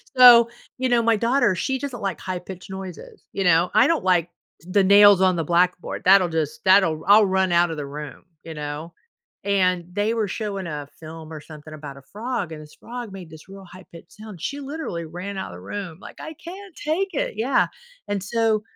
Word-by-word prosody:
So, 240 -2 +9 0.3
you 260 0 0
know, 240 -1 +3
my 230 0 +3
daughter, 230 -3 +2
she 265 +9 -1
just 280 +1 -5
don't 245 -3 -8
like 195 -4 -3
high 185 -1 -4
pitched 185 +1 -10
noises, 190 -3 -9
you 195 - -1
know? 175 0 +4
I 220 +6 +5
don't 330 - +1
like 180 -2 +2 0.3
the 185 +3 +1
nails 200 0 +7
on 185 -1 +4
the 165 - -1
blackboard, 175 +3 0
that'll 185 -1 +6
just 160 +6 -3
that'll 185 -5 +4
I'll 210 +1 +7
run 190 -1 +1
out 170 0 +3
of 160 - -5
the 145 - -4
room, 145 +1 -8 0.2
you 165 - -8
know? 150 +2 -6 0.5
And, 185 -3 +1
they 205 +4 0
were 225 -2 -1
showing 200 -3 -4
a 150 -3 -5
film 160 0 -10
or 155 - -8
something 155 0 -12
about 145 -2 -9
a - - -12
frog, 215 -5 -4
and 155 -1 -8
this 150 0 -15
frog 240 -2 -7
made 185 -4 -10
this 160 +3 -14
real 195 0 -11
high 185 +1 -14
pitch 165 0 -12
sound. 210 -5 -12
She 285 +9 -4
literally 280 - -5
ran 180 +5 -7
out 190 - -5
the 90 - -10
room, 170 - -7
like, - - -12
"I 315 - -7
can't 370 +3 -11
take 335 +6 -1
it!" - - -2
Yeah. 250 +5 +2 0.4
And 200 -2 -2
so, 220 0 +1
190 Hz, 215 wpm, -23 LUFS, 165-220 Hz, 0.5 s, So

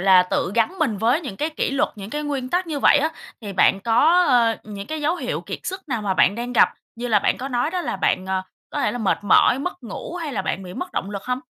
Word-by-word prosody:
là, 190 -1 +6
tự 180 +1 -1
gắn 235 +11 +1
mình 280 -10 +1
với 240 - +2
những 260 - -7
cái 305 +7 -1
kỷ 310 - -1
luật, 275 0 +1
những 200 0 -8
cái 295 +4 -3
nguyên 280 -4 -3
tắc 355 +5 0
như 310 -3 -3
vậy 290 - +5
á, 300 +3 +1 0.3
thì 205 -3 -6
bạn 195 +1 +3
có, 310 +10 +4
ờ, 235 -3 +4
những 200 -1 -7
cái 315 +4 -4
dấu 310 +4 +1
hiệu - - -3
kiệt - - -6
sức 375 -3 -6
nào 235 -5 -2
mà 195 -2 0
bạn 185 - +4
đang 240 +2 -4
gặp, 240 - +6 0.3
như 245 +1 -4
là 215 -3 +4
bạn - - +1
có 265 - -4
nói 245 +3 0
đó 365 +1 -2
là 340 - -3
bạn, 190 -1 0
ờ, 190 0 -1 0.3
có - - -3
thể - - +1
là, 245 - -4
mệt 215 -5 +1
mỏi, 205 +5 +5
mất 285 0 -5
ngủ 230 - -7
hay 325 -5 -4
là 200 -6 -2
bạn 190 0 -2
bị 180 -1 -9
mất 360 - -5
động 195 - -3
lực 200 -1 -5
hông? 250 0 -2
240 Hz, 285 wpm, -22 LUFS, 200-300 Hz, 0.3 s, là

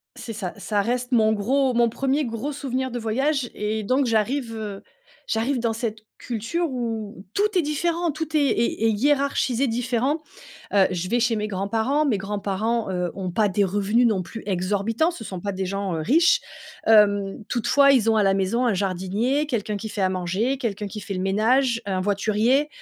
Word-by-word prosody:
C'est 225 - -7
ça, 195 -4 -5
ça 205 0 0
reste 245 +4 -2
mon 220 -2 +4
gros 255 +5 +1
mon 235 0 +4
1er 275 +5 0
gros 230 +5 -4
souvenir 260 -2 -3
de 245 - -3
voyage 260 +4 0
et 215 +1 -2
donc 255 +5 +1
j'arrive, 230 +2 0
heu, 210 -3 -6 0.4
j'arrive 240 +4 0
dans 230 -1 0
cette 225 -1 -3 0.2
culture 250 +9 -2
où 225 -6 -4
tout 410 -1 +1
est - - +5
différent, 335 +3 0
tout 315 +1 -5
est - - +5
est 235 -5 +1
est 225 - +4
hiérarchisé, 270 +1 +1
différent. 245 +5 0 0.5
Heu, 195 -2 +5
je 180 0 -2
vais 240 +5 +1
chez 230 -1 +2
mes 210 0 -2
grands-parents. 220 +9 0
Mes 245 -8 +1
grands-parents, 205 +3 -2
heu, 180 -1 -1
ont 185 -2 -4
pas 210 +4 +2
des 200 +1 +1
revenus 205 +5 +2
non 210 -5 +2
plus 225 +5 -8
exorbitants, 205 - 0
ce 295 -10 -9
sont 190 -4 -6
pas 200 +2 -3
des 190 0 -3
gens, 195 -1 -2
heu, 160 - -2
riches. 335 - +4 0.5
Hem, 205 -1 +4
toutefois, 275 +4 +4
ils 225 -4 +3
ont, 220 - +2
à - - +4
la 195 -1 +3
maison, 195 +6 +1
un 235 - +2
jardinier, 200 +9 0
quelqu'un 215 -5 -2
qui 220 - -6
fait 210 -1 -4
à 190 - +3
manger, 190 +8 -1
quelqu'un 210 -5 -3
qui 205 +2 -7
fait 200 0 -6
le 185 - -3
ménage, 230 +5 +2
heu, - - -2
un 185 -1 0
voiturier. 215 +8 +2
225 Hz, 195 wpm, -24 LUFS, 200-260 Hz, 0.5 s, est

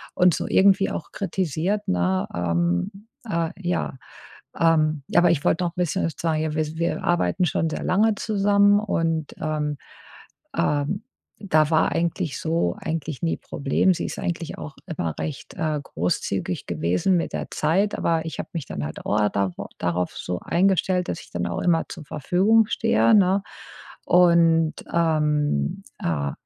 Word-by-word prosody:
Und 180 -2 +5
so - - -3
irgendwie 195 0 +4
auch 160 - -6
kritisiert, 190 +1 -2
ne? 90 +1 +1
Ähm, 85 - -1 0.2
äh, 165 -2 0
ja, 175 -7 -2 0.6
ähm 155 -3 +3
ja, 175 - +4
aber 175 - +4
ich 150 -3 +1
wollte 180 +2 +2
noch 170 - -1
'n - - -47
bisschen 180 0 0
sagen, 155 -2 -1
wi 155 0 -2
wir 170 - -1
arbeiten 175 +2 +1
schon 160 0 0
sehr - - -4
lange 210 +4 +3
zusammen 205 -1 +3
und, 165 -6 -1
ähm, 150 -1 -2 0.8
ähm, 145 - 0 0.3
da 155 -7 +2
war 160 - +3
eigentlich 170 -2 -1
so 160 - 0
eigentlich 160 -3 -4
nie 165 - 0
Problem. 140 +7 +1
Sie - - -3
ist - - -6
eigentlich 170 -1 -3
auch 150 - -7
immer 85 - -3
recht, 150 - -5
äh, 155 -2 -1
großzügig 90 -1 -2
gewesen 85 - +1
mit - - -3
der - - -3
Zeit, 190 +7 +1
aber 165 -1 0
ich 160 - -6
habe - - -6
mich 160 -5 -3
dann 75 - -5
halt 75 - -7
au 105 0 +2
da 100 -2 0 0.3
darauf 90 +1 -1
so 90 - -4
eingestellt, 185 0 +1
dass - - -4
ich - - -15
dann 85 0 -2
auch 85 - -3
immer 165 -2 +2
zur 160 - -8
Verfügung 195 +11 +3
stehe, 230 0 +3
ne? 195 0 +4 0.6
Und, 170 -2 +5 0.2
ähm, 150 - +1 0.2
äh, 70 -4 -1
165 Hz, 160 wpm, -24 LUFS, 145-180 Hz, 0.8 s, Und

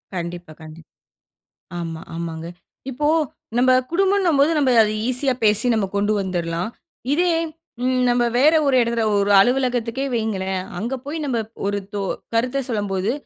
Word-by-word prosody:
கண்டிப்பா, 175 -1 -5
கண்டிப்பா. 160 +1 -12 0.9
ஆமா, 165 -1 -5
ஆமாங்க. 165 -1 -5 0.4
இப்போ 295 +4 -1 0.5
நம்ப 255 +1 +4 0.2
குடும்பம்னம்போது 350 -5 +3
நம்ம 275 -3 +3
அது 210 - 0 0.2
ஈஸியா 255 +1 0
பேசி 215 +3 +3
நம்ம 215 -3 +1
கொண்டு 205 +1 +1
வந்தரலாம். 175 -1 -2 0.4
இதே 350 +3 +2 0.5
ம் 255 0 +1
நம்ம 240 0 +2
வேற 300 +5 +5
ஒரு 270 - +3
இடத்துல 235 -1 0
ஒரு 200 0 +2
அலுவலகத்துக்கே 250 +2 +1
வைங்களேன். 190 -4 -2 0.2
அங்க 235 +5 -3
போய் 305 +3 -4
நம்ம 255 -4 -1 0.3
ஒரு 205 0 0 0.2
தொ 205 - -2 0.3
கருத்த 250 +4 +1
சொல்லும்போது, 205 -2 -1
230 Hz, 135 wpm, -21 LUFS, 190-260 Hz, 0.9 s, வேற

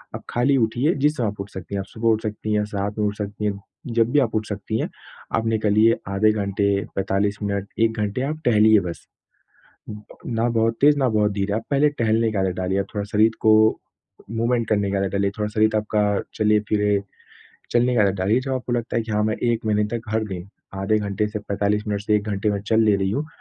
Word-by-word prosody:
आप - - -7
खाली 130 +3 +2
उठिए, 120 +7 +1
जिस 150 +2 +1
समय 120 - 0
आप 105 -1 -4
उठ 100 - -7
सकती 95 +1 -7
हैं, - - -1
आप - - -8
सुबह 115 +2 -1
उठ 110 -1 +2
सकती 110 0 -3
हैं, 105 0 +1
सात 105 0 -4
में 105 - +2
उठ 105 0 -4
सकती 105 0 -4
हैं 100 -1 -1 0.3
जब 115 0 +1
भी 145 - +4
आप 120 -6 0
उठ 110 0 0
सकती 105 +2 -3
हैं, - - -2 0.5
आप 115 - -1
निकलिए 110 0 +3
आधे 100 +2 +3
घंटे, 100 -1 -1 0.3
45 100 +2 0
मिनट, 100 -1 -2
1 115 0 +2
घंटे 105 +4 -1
आप 155 +3 -3
टहलिए 110 -2 +5
बस। 85 -2 -7 1.2
ना 115 0 0
बहुत 115 0 +1
तेज़, 145 +1 +6
ना 130 - +2
बहुत 105 -2 +1
धीरे, 100 0 -2
आप 110 +1 -2
पहले 145 +1 +4
टहलने 115 0 +2
का 105 - -2
आदत 95 -1 0
डालिए, 95 +1 -1
आप 100 - -3
थोड़ा 100 -1 -2
शरीर 110 +2 +4
को 110 - +5 0.8
मूवमेंट 115 +1 0
करने 100 -2 +1
का 100 - +1
आदत 95 -1 -1
डालिए, 100 0 +1
थोड़ा 105 0 -1
शरीर 110 0 +3
आपका 105 0 0 0.3
चले-फिरे, 105 -1 +2 0.7
चलने 120 +1 +3
का 110 - +5
आदत 100 -1 +2
डालिए। 100 +7 +2
जब 135 +1 -4
आपको 125 -1 -3
लगता 120 -1 -2
है 115 - +1
कि 110 -1 -6
हाँ, 105 - +1
मैं 110 0 0
1 120 -1 -1
महीने 105 -1 +2
तक 115 - -7
हर 110 0 0
दिन 95 0 -6 0.3
आधे 110 +2 +2
घंटे 105 +1 -1
से 105 0 -4
45 105 0 -1
मिनट 100 -1 -1
से 105 +1 +1
1 105 - -1
घंटे 100 +1 0
में 100 -1 -1
चल 110 +2 +2
ले 105 -2 +4
रही 95 -1 -1
हूँ, 145 +9 -2
105 Hz, 230 wpm, -22 LUFS, 100-115 Hz, 1.2 s, तेज़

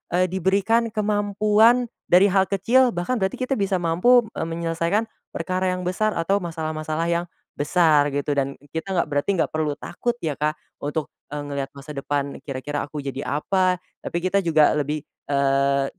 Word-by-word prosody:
eee, 185 +1 +2
diberikan 200 +5 +2
kemampuan, 215 +3 +3 0.2
dari 180 +3 +7
hal 190 0 +4
kecil 240 +7 +3
bahkan 175 +9 -1
berarti 190 -1 0
kita 260 +1 0
bisa 195 -1 +1
mampu, 180 +10 +4 0.2
eee, - - -1
menyelesaikan 170 +5 0 0.3
perkara 185 +2 -1
yang 180 - -5
besar 215 +4 0
atau 170 +4 +1
masalah-masalah 160 -1 -3
yang 170 +1 0 0.3
besar 150 -1 +3
gitu, 145 +1 -1
dan 140 0 0
e 145 - -23
kita 185 +4 -3
nggak 170 - +1
berarti 145 +4 0
nggak 170 - 0
perlu 155 -2 -1
takut 240 +7 -3
ya, 155 -3 0
Kak, 150 +1 0 0.3
untuk, 145 +1 -3 0.2
eee, 145 0 -4
ngelihat 140 -1 -3
masa 140 +2 -9
depan 140 0 -3
kira-kira 145 +1 -4
aku 150 -1 -6
jadi 135 0 -4
apa, 185 +5 +1 0.3
tapi - - -3
kita 185 +2 +2
juga 155 -4 +4
lebih, 150 +1 -2 0.3
eee, 140 0 +2
165 Hz, 170 wpm, -23 LUFS, 145-195 Hz, 0.3 s, dari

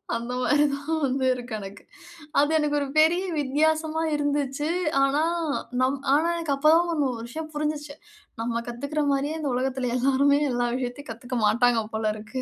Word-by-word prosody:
அந்த 235 +2 -4
மாதிரி 290 +3 +3
தான் 300 +3 -3
வந்து 265 0 -1
இருக்கு 245 -2 -7
எனக்கு. 195 0 -10 0.6
அது 290 +2 +3
எனக்கு 300 -1 0
ஒரு 280 - -2
பெரிய 330 +4 +4 0.2
வித்தியாசமா 310 +3 +1
இருந்துச்சு. 290 0 -1 0.4
ஆனா 275 +2 +2 0.6
நம் 265 +2 +2 0.2
ஆனா 315 +3 +2
எனக்கு 330 -4 -1
அப்போ 290 +3 +3
தான் 345 +1 +2 0.2
ஒரு 230 - -7
விஷயம் 315 +6 -6
புரிஞ்சுச்சு. 295 -1 -3 0.5
நம்ம 235 0 -1
கத்துக்கிற 280 +6 -3
மாரியே 285 +3 -1
இந்த 300 -3 -2
உலகத்தில 255 -1 -1
எல்லாருமே 275 +2 +3
எல்லா 245 0 0
விஷயத்தையும் 255 +2 -5
கத்துக்க 245 +3 -5
மாட்டாங்க 235 +2 +3
போலருக்கு. 220 +3 -3
275 Hz, 155 wpm, -25 LUFS, 245-300 Hz, 0.6 s, பெரிய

